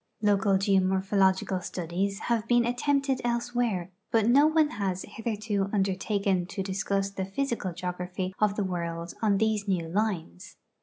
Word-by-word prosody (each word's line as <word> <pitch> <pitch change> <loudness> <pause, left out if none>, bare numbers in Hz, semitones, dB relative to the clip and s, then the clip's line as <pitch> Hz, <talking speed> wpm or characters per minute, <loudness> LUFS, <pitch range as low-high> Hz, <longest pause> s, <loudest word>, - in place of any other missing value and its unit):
Local 200 -1 +3
geomorphological 190 -1 +2
studies 185 +4 -3
have 230 -2 0
been 240 0 +4
attempted 270 +2 +1
elsewhere, 235 -6 -1 0.2
but 225 -2 +3
no 280 +5 +6
one 310 -1 +3
has 190 -2 -2
hitheido 210 -3 -2
undertaken 195 -2 0
to 195 - -4
discuss 195 0 -1
the 195 -1 -3
physical 225 -2 -2
geography 180 +1 -4
of 210 -1 +2
the 210 - 0
world 170 -2 -4
on 210 -3 +3
these 215 -1 0
new 180 -4 0
lines. 175 - -3
195 Hz, 140 wpm, -28 LUFS, 185-220 Hz, 0.2 s, no